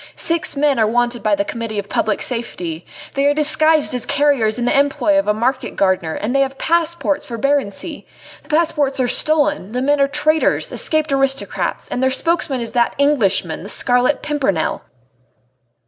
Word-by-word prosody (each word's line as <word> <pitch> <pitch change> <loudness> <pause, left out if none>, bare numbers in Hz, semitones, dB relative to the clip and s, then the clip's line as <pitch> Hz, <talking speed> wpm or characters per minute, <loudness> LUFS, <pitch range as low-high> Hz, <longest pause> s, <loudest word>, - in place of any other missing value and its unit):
Six 330 -3 -2
men 280 -3 +2
are 220 - +3
wanted 240 +1 0
by 215 -1 +2
the 200 0 -1
Committee 230 -1 -5
of 200 0 -3
Public 215 +1 -1
Safety. 180 -9 -5 0.3
They 280 0 +1
are 290 - +2
disguised 310 0 +3
as 250 -2 -3
carriers 275 -7 +2
in 240 - -2
the - - +1
employ 285 +2 +2
of 295 - -2
a - - +4
market 255 +4 -2
gardener, 185 -4 0
and 225 +6 -3
have 270 0 +1
passports 335 -3 0
for 235 - -5
Barency!... 280 - -2 0.4
The - - -24
passports 300 -4 +1
are 255 - +2
stolen: 290 -8 +1
the 250 - -1
men 290 +1 +2
are 275 - +4
traitors 300 +2 +1
escaped 310 -1 0
aristocrats 270 0 -1
and 250 - -3
their 260 - +3
spokesman 275 -1 -1
is 230 - -5
that 240 -1 0
d 280 - +3
d 290 - +4
Englishman, 195 - 0
the 195 - -7
Scarlet 250 +5 +1
Pimpernel." 260 - -1
270 Hz, 180 wpm, -18 LUFS, 230-295 Hz, 0.4 s, a